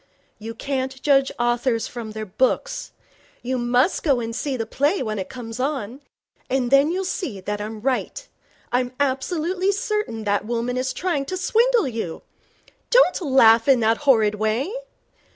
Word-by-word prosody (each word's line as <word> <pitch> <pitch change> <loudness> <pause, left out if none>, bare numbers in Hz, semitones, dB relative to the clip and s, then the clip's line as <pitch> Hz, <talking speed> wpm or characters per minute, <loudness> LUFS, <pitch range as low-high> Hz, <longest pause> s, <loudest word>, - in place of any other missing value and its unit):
'You 225 +1 -7
can't 265 +1 -3
judge 275 -2 +3
authors 240 -1 +1
from 230 -3 -7
their 215 0 -5
books. 265 - -1 0.5
You 255 +1 -1
must 245 +7 +2
go 275 -6 +2
and 230 -1 -4
see 275 0 -2
the 225 - -2
play 285 - 0
when 215 -3 -3
it 190 - -5
comes 235 -2 -8
on. 265 -2 -3 0.5
Then 270 +3 +3
you'll 375 +2 -2
see 295 - -3
I'm 210 +1 -4
right. 270 - -2 0.4
I'm 245 0 0
absolutely 330 +8 0
certain 400 - -2
that 205 -1 0
woman 240 +2 -2
is 255 +1 -1
trying 340 -7 -1
to 370 - -4
swindle 460 - +2
you. 220 -9 -5 0.7
Don't - - +4
laugh 235 -6 +5
in 270 -3 +5
that 225 +1 +3
horrid 225 -8 +3
way. 220 - -1
255 Hz, 150 wpm, -22 LUFS, 225-295 Hz, 0.7 s, laugh